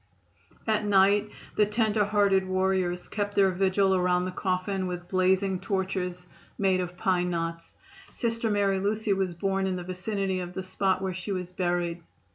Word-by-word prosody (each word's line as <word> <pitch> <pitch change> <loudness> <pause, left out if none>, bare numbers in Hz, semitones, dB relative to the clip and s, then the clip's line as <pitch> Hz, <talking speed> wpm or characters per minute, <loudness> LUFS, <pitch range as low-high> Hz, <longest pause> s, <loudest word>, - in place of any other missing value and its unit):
At 215 -1 +1
night 205 +1 +4 0.3
the 210 - +4
tender 215 0 +2
hearted 200 -2 +2
warriors 185 -1 0
kept 205 -1 -3
their 195 -1 +4
vigil 190 +1 +2
around 180 -1 +2
the 185 - -3
coffin 185 +1 -1
with 175 -1 -5
blazing 185 0 +2
torches 185 -3 -2 0.3
made 190 -2 +2
of 180 0 -6
pine 180 -2 +1
knots. 165 -1 -4 0.4
Sister 230 -1 -1
Mary 200 -2 +2
Lucy 210 +1 0
was 190 -3 -1
born 195 +2 0
in 185 - -1
the 180 - -5
vicinity 190 +1 -2
of 180 0 -5
the 190 - -3
spot 190 0 0
where 190 -1 -1
she 185 +3 -5
was 180 -1 -4
buried. 175 -1 -1
190 Hz, 165 wpm, -27 LUFS, 180-200 Hz, 0.4 s, night